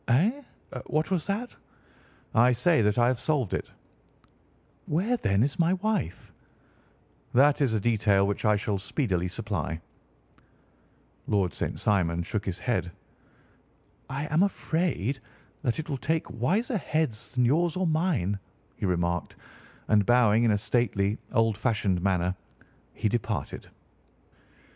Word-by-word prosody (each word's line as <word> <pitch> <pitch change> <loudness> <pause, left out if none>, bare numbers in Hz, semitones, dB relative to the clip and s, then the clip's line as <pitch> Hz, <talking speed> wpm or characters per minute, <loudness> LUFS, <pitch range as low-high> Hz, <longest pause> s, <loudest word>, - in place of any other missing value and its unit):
"Eh? 195 - +2 0.5
What 155 +4 0
was 180 -5 0
that?" 215 +5 -3 0.8
"I 120 +2 +5
say 155 +6 +3
that 105 0 +2
I 120 - +5
have 125 -1 +1
solved 135 - 0
it." - - -3 1.2
"Where, 190 +11 +1
then, 100 - +1
is 140 +4 -2
my 170 +2 +3
wife?" 195 - -2 1.0
"That 145 +3 +5
is 130 -5 +2
a 110 - +1
detail 105 -3 +3
which 100 0 -2
I 105 -1 +4
shall 105 -1 -1
speedily 95 - -1
supply." 85 -2 -3 1.5
Lord 100 -4 +1
St. - - -3
Simon 85 -4 +1
shook 105 +3 -3
his 95 -1 -2
head. 90 -8 -1 1.2
"I 140 +2 -3
am 160 - +4
afraid 160 - 0 0.4
that 120 - 0
it 160 - -4
will 140 -4 -2
take 160 +4 -1
wiser 210 - +1
heads 150 -9 -2
than 125 -1 +3
yours 160 +6 +2
or 185 0 0
mine," 155 - 0 0.4
he - - -1
remarked, 85 -1 -1 0.5
and 105 -2 +4
bowing 115 0 +4
in 115 - +4
a 105 - +3
stately, 105 -2 0
old 115 -3 +2
fashioned 105 -7 +1
manner 90 -1 +1 0.6
he - - 0
departed. 115 +1 -3
120 Hz, 135 wpm, -27 LUFS, 100-155 Hz, 1.5 s, I